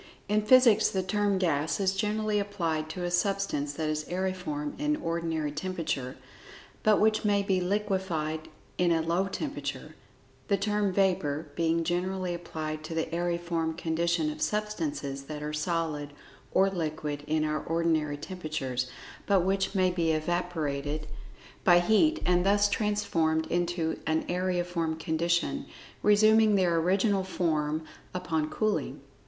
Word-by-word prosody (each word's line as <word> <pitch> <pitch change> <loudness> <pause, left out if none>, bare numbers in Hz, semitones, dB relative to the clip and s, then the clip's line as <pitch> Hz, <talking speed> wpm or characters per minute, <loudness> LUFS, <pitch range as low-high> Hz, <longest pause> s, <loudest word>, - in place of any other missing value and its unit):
In 210 +1 +2
physics 240 0 +6
the 190 -1 -1
term 205 +1 +1
"gas" 160 -4 0
is 190 -1 +2
generally 215 +1 0
applied 165 -6 -2
to 180 +2 -5
a 175 - -1
substance 175 -6 0
that 155 +1 -2
is 155 0 -1
aeriform 180 -5 -3
in 300 0 +1
our - - -9
ordinary 165 -2 -1
temperature, 155 -5 -3 0.6
but 215 -1 +4
which 215 0 +3
may 205 -1 +2
be 190 -2 +1
liquefied 180 -5 -1 0.3
in 175 -1 +3
a 165 -1 +2
low 170 +4 +1
temperature; 285 +9 -5 0.5
the 200 - +2
term 205 0 0
"vapor" 180 -6 +1
being 165 0 +1
generally 180 +2 -1
applied 155 -3 -5
to 165 - -5
the 160 0 -2
aeriform 170 -1 -1
condition 165 -1 0
of - - -9
substances 210 - -2
that 150 0 -6
are 150 0 -4
solid 150 -2 -2 0.4
or 190 +1 +4
liquid 155 -5 -3
in 155 0 +1
our 155 0 -1
ordinary 160 -3 0
temperatures, 145 -6 -3 0.4
but 195 -2 +4
which 190 +2 0
may 185 -1 +3
be 165 -2 +1
"evaporated" 155 -3 -2 0.6
by 175 -2 +7
heat, 265 - +3
and 180 0 +3
thus 205 +1 +4
transformed 200 -7 +1
into 175 -2 0
an 160 0 +1
aeriform 175 -2 -1
condition, 170 +2 0 0.3
resuming 215 +1 +5
their 180 -3 +3
original 195 +3 +2
form 160 -4 -1 0.3
upon 160 -4 -1
cooling. 215 +4 -1
175 Hz, 140 wpm, -29 LUFS, 155-195 Hz, 0.6 s, by